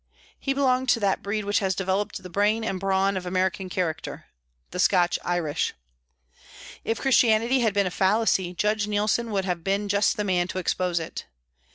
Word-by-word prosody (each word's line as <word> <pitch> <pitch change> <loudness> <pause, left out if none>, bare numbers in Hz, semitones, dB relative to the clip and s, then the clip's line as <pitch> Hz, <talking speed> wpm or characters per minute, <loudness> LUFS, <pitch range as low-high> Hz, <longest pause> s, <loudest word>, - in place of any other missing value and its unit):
He 275 - -1
belonged 260 -2 +1
to 240 - +4
that 200 -2 +1
breed 205 +1 -3
which 205 0 +2
has 190 -2 0
developed 190 +1 -2
the 180 - -8
brain 210 +4 +1
and 195 -4 -2
brawn 195 0 +1
of 185 -1 -4
American 185 +1 -1
character 170 -4 -3 0.5
the - - -5
Scotch 180 -2 +3
Irish. 175 -4 -1 1.1
If 225 - -2
Christianity 240 -1 +3
had 220 -4 +1
been 200 -1 +3
a 185 - -2
fallacy, 190 -2 +1
Judge 210 +2 0
Neilson 210 +3 0
would 195 -3 -1
have 175 -3 -2
been 200 +2 0
just 200 0 +2
the 210 - 0
man 180 -3 +1
to 185 - -6
expose 180 -1 0
it. 160 - -6
195 Hz, 180 wpm, -25 LUFS, 185-215 Hz, 1.1 s, to